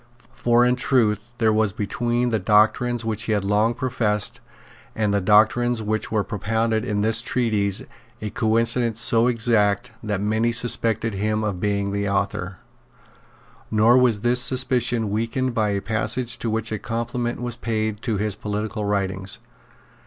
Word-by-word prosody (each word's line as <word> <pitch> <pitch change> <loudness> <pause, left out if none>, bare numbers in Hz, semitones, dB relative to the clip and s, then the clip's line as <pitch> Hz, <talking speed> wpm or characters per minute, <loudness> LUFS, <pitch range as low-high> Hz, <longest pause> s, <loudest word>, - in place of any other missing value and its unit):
For 120 0 +3
in 125 0 +2
truth 110 -4 +1
there 110 -2 +2
was 110 -2 +1
between 120 +3 -1
the 110 -2 0
doctrines 110 +4 +2
which 110 -2 -2
he 110 - 0
had 100 -2 -1
long 105 +3 +2
professed 115 -5 -1 0.6
and 105 -2 0
the 100 - +1
doctrines 110 +4 +3
which 110 +1 -2
were 110 -2 +1
propounded 110 +2 -1
in 105 -4 -1
this 110 +1 +2
treatise 110 -6 0 0.4
a 105 -1 -5
coincidence 115 +1 0
so 115 0 +3
exact 115 -1 +1
that 105 -3 -2
many 110 +3 +1
suspected 115 -2 +1
him 105 +2 -1
of 100 -4 -2
being 100 0 -1
the 100 0 -1
author; 95 -1 -2 1.1
nor 110 +2 +4
was 125 -5 +3
this 120 +1 +2
suspicion 120 -4 +1
weakened 115 +4 -1
by 110 -3 +1
a 100 -1 -1
passage 115 +3 -1
to 115 - -2
which 110 +1 -1
a 110 - -2
compliment 120 +1 -3
was 120 -1 -4
paid 110 -2 -2
to 110 -3 -1
his 105 +1 -1
political 105 +2 -4
writings. 95 -2 -1
110 Hz, 155 wpm, -23 LUFS, 105-120 Hz, 1.1 s, nor